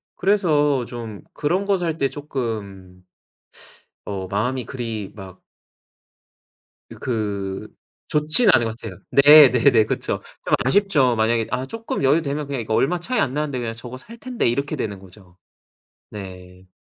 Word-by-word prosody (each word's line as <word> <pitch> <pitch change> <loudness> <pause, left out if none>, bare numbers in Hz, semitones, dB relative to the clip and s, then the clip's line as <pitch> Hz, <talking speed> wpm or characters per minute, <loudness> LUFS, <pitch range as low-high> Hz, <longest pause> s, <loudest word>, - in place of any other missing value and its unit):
그래서 150 - +2
좀 115 -2 -8
그런 180 +6 -1
거 200 - +2
살 165 -3 -2
때 140 - +1
쪼끔 105 -10 -6 1.0
어 95 -2 -5
마음이 125 +6 -2
그리 115 -5 -5
막 95 -3 -11 1.5
이 - - -9
그 100 -5 -3 0.4
좋지는 155 +9 +4
않은 120 - +4
것 110 0 -4
같아요. 100 -7 -9
네, 145 0 +8
네네, 115 -3 +4
그쵸. - - -2 0.3
좀 - - +2
아쉽죠. 140 - +3
만약에 110 0 +1
아 130 +1 -2
쪼끔 225 -3 -4
여유 145 +5 +4
되면 145 0 -3
그냥 140 -2 -3
이거 110 -1 -4
얼마 170 +10 +1
차이 250 +9 -2
안 130 -2 0
나는데 150 -3 -2
그냥 115 -2 -3
저거 120 +2 -9
살 220 - -12
텐데 250 +1 -2
이렇게 140 +4 -1
되는 100 -3 -4
거죠. 95 -1 -17 0.7
네. 90 -2 -11
125 Hz, 270 characters per minute, -22 LUFS, 105-150 Hz, 1.5 s, 네